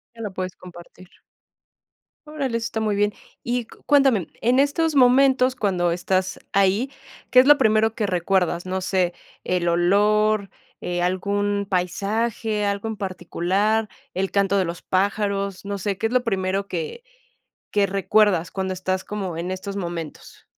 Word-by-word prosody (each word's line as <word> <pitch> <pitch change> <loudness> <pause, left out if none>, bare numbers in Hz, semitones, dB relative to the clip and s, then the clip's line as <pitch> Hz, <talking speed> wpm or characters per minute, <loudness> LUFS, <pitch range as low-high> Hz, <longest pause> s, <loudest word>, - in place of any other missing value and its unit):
Que 230 - -10
lo 205 -3 -4
puedes 185 -1 -5
compartir. 180 0 -14 1.2
Órale, 280 -6 -3
eso 230 - -4
está 220 - -3
muy 215 -2 0
bien. 205 +1 +1 0.3
y 240 -1 -1
cuéntame, 270 - +2
en 245 +3 +3
estos 300 +2 +1
momentos 260 0 +5
cuando 180 -5 +1
estás 185 +2 -1
ahí, 200 +6 +2 0.4
¿qué 255 - +7
es 255 - +6
lo 295 0 +8
primero 220 -3 +3
que 210 - -1
recuerdas? 180 -1 0
No 185 +1 -2
sé, 185 -1 0 0.3
el 180 -1 -1
olor, 205 +4 +2 0.3
eh, 175 0 -3
algún 200 +2 0
paisaje, 210 +3 -1
algo 200 +2 -2
en 220 - -3
particular, 195 +3 -1 0.2
el 190 +1 -2
canto 200 0 +2
de 190 - +3
los 170 -1 -5
pájaros, 200 0 -1
no 200 0 -3
sé 195 0 -2
qué 225 - -2
es 230 - -6
lo 255 -1 +3
primero 195 -3 -1
que 470 - -5 0.7
que 205 -1 +2
recuerdas 195 -2 +2
cuando 190 -1 -3
estás 185 0 -2
como 195 -5 -4
en 170 +3 -4
estos 190 +1 -5
momentos. 170 -5 -6
200 Hz, 155 wpm, -23 LUFS, 185-220 Hz, 1.2 s, lo